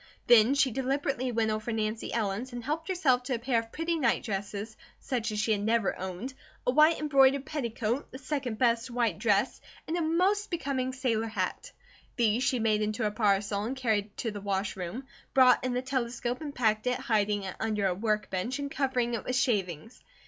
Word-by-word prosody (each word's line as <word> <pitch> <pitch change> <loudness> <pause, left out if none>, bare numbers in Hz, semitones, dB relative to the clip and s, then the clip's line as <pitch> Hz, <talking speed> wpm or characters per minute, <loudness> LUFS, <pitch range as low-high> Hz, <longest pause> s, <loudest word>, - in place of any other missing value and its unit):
Then 240 +2 +6
she 275 -2 +3
deliberately 265 0 -1
went 225 -1 +1
over 215 +2 -3
Nancy 220 0 -2
Ellen's 225 +3 -2
and 240 -1 -5
helped 310 +5 -3
herself 310 -10 +2
to 260 - 0
a - - -2
pair 235 0 +1
of 225 0 -8
pretty 330 +1 -1
nightdresses, 210 -3 -1 0.2
such 235 -4 -2
as 210 - -2
she 220 +1 +1
had 205 -2 +1
never 220 0 +1
owned, 190 +8 -5 0.3
a - - +3
white 305 +4 +5
embroidered 275 -2 +4
petticoat, 240 -3 -2
the 260 - -7
second 265 -4 -3
best 235 0 +2
white 235 -7 0
dress, 210 +1 +1 0.3
and 320 - -1
a 350 - 0
most 370 +6 +1
becoming 275 -6 -2
sailor 240 -4 -1
hat. 195 -5 -3 0.4
These 230 0 +2
she 255 0 +2
made 220 -2 +1
into 215 +2 -1
a 210 - +1
parcel 205 -1 +1
and 245 +5 -3
carried 215 -5 -1
to 230 - -2
the 205 -1 -7
wash 195 0 -2
room, 190 +8 -5 0.3
brought 255 -2 +6
in 255 -1 -1
the 250 - -1
telescope 250 -1 -2
and 290 -2 -6
packed 220 -1 +1
it, 250 - +1
hiding 210 -2 +1
it 190 -1 -5
under 215 -2 0
a 190 - +2
workbench 215 +3 -1
and 280 -1 -4
covering 255 -3 0
it 235 - -2
with 255 - -2
shavings. 210 - -1
235 Hz, 195 wpm, -29 LUFS, 215-265 Hz, 0.4 s, Then